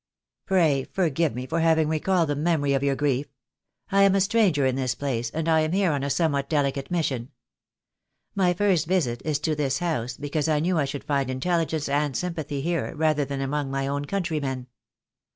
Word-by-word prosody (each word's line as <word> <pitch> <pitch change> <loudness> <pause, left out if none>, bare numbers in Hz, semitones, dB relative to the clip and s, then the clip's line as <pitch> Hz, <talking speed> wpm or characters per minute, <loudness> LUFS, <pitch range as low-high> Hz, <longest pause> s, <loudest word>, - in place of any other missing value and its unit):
"Pray 160 -8 +3
forgive 165 - 0
me 125 +1 -4
for 165 - -1
having 160 -1 +3
recalled 165 +1 +1
the 145 - 0
memory 150 -2 +1
of 135 - +1
your 140 -1 +1
grief. 140 -1 0 0.6
I 200 0 +4
am 195 0 +5
a - - +3
stranger 195 -8 +3
in 130 -1 +1
this 130 -2 -1
place, 120 -5 -2
and 160 +5 -3
I 160 -1 +4
am 155 +1 0
here 190 -3 +2
on 140 -2 -1
a 140 - -2
somewhat 140 -3 0
delicate 140 -3 0
mission. 135 -8 -1 1.0
My 180 -3 +2
first 180 -5 +2
visit 150 -10 0
is 155 -2 0
to 155 +1 0
this 140 -2 0
house, 125 -9 -2
because 145 +2 -2
I 150 -1 +2
knew 170 +2 +1
I 145 - +2
should 140 +1 -5
find 140 -3 0
intelligence 160 +3 -1
and 145 -1 0
sympathy 160 -5 -3
here 170 +2 -2
rather 155 -2 +1
than 140 0 -4
among 140 +1 -2
my 135 0 -2
own 140 +1 -2
countrymen. 150 -8 -2
150 Hz, 195 wpm, -25 LUFS, 140-170 Hz, 1.0 s, am